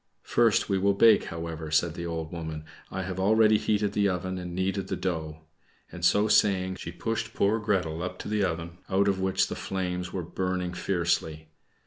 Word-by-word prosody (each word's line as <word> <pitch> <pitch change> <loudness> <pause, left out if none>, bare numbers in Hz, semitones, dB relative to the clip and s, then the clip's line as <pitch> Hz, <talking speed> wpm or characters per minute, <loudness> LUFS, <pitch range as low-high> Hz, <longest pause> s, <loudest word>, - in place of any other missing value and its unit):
"First, 115 -2 +3
we 95 -2 +1
will 100 +1 +2
bake, 115 +3 +6
however," 80 -1 -5
said 80 +1 +2
the 85 0 -5
old 80 -1 -4
woman; 80 -2 -6 0.2
"I 95 - -4
have 95 0 -4
already 110 +2 +4
heated 105 -1 0
the 100 -1 +2
oven 95 0 -3
and 90 -1 -6
kneaded 95 +1 -1
the - - -2
dough;" 80 -4 -3 0.5
and - - -9
so 105 +1 +4
saying, 95 -3 +3
she 85 - -6
pushed 115 +4 -3
poor 105 +3 +2
Gretel 90 -7 -1
up 90 0 -4
to - - -7
the 105 -1 0
oven, 85 -1 -3
out 100 +1 +2
of 95 -1 +1
which 95 0 +2
the - - -5
flames 90 -1 -3
were 90 -2 -3
burning 90 +1 -2
fiercely. 85 -4 -1
95 Hz, 190 wpm, -27 LUFS, 85-100 Hz, 0.5 s, bake